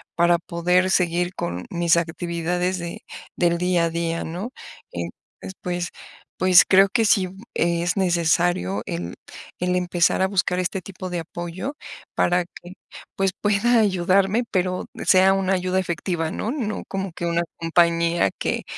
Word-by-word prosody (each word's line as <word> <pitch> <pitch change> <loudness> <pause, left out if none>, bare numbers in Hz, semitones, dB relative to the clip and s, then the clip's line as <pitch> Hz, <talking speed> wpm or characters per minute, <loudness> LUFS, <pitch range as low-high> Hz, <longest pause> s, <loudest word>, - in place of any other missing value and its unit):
para 170 0 +4
poder 180 +2 +1
seguir 175 0 +1
con 90 +1 -4
mis 170 -1 +2
actividades 170 +2 -1
de 170 0 -7 0.3
del 170 -1 +2
día 180 -1 +1
a - - 0
día, 165 0 -2
¿no? 180 +9 -5 0.4
Entonces - - -4 0.5
pues, 175 -1 -2 0.5
pues 185 -1 +7
creo 195 +1 +6
que 230 +2 +2
sí 200 -3 +3
b 185 - -12 0.2
es 170 +1 0
necesario 170 - +1
el 85 +1 -5 0.4
el 180 0 0
empezar 175 0 +1
a 190 - +3
buscar 180 -2 0
este 185 +1 -2
tipo 185 0 -8
de 175 -1 -2
apoyo, 175 - -5 0.4
para 175 0 +2
que 175 +1 -13 0.4
pues, 195 -1 +1
pueda 215 +4 +3
ayudarme, 195 +2 +2
pero 185 -1 0 0.2
sea 190 +1 +6
una 195 0 +1
ayuda 185 0 0
efectiva, 170 -2 -2
¿no? 220 - -3
No 235 -7 -3
como 195 -1 -3
que 175 - -5
una 170 0 +1
compañía, 170 - +2
que - - -1
180 Hz, 150 wpm, -23 LUFS, 170-190 Hz, 0.5 s, pues